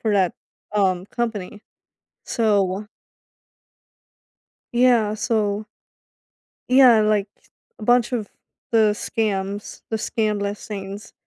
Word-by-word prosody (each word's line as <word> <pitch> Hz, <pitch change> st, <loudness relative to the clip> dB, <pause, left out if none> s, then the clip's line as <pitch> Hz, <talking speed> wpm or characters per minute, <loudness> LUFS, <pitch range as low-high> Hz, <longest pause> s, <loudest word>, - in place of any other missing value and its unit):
for 220 Hz, -, 0 dB
that, 185 Hz, -3 st, +2 dB, 0.4 s
um, 190 Hz, -3 st, +1 dB
company. 215 Hz, -3 st, -4 dB, 0.6 s
So 205 Hz, -3 st, +1 dB, 1.9 s
Yeah, 240 Hz, -4 st, +4 dB
so 215 Hz, -1 st, -1 dB, 1.0 s
Yeah, 250 Hz, -4 st, +7 dB
like 210 Hz, -1 st, +2 dB, 0.5 s
a -, -, -9 dB
bunch 245 Hz, +2 st, +3 dB
of 220 Hz, -5 st, -2 dB, 0.4 s
the 220 Hz, -2 st, +4 dB
scams, 205 Hz, -2 st, -3 dB
the 220 Hz, -, -1 dB
scam 215 Hz, -1 st, -1 dB
listings, 200 Hz, 0 st, -6 dB
210 Hz, 90 wpm, -22 LUFS, 200-225 Hz, 1.9 s, Yeah